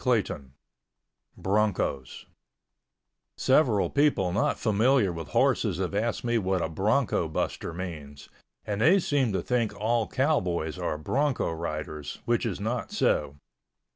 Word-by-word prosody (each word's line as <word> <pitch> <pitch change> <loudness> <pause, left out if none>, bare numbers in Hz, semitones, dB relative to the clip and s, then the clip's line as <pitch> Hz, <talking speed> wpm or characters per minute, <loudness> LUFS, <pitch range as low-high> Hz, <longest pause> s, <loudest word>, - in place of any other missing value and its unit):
CHAPTER 125 -3 +4 0.2
XVI 70 -2 -19 0.9
BRONCOS 95 -10 -1 1.1
Several 130 -6 +3
people 140 -11 +2
not 100 - +1
familiar 110 -2 +2
with 80 -3 -6
horses - - +1
have 95 0 -2
asked 110 +3 -1
me 120 -1 +1
what 95 -3 0
a - - -2
bronco 105 - +1
buster 80 - -3
means, 80 -5 -7 0.4
and 105 0 -2
they 165 - +6
seem 145 - +1
to - - -1
think 120 -4 0
all 115 +1 +1
cowboys 90 - 0
are 75 - -2
bronco 135 - 0
riders, 75 -2 -5
which 120 0 +1
is 100 -5 -4
not 115 +4 -3
so. 70 - +1
105 Hz, 135 wpm, -27 LUFS, 85-120 Hz, 1.1 s, they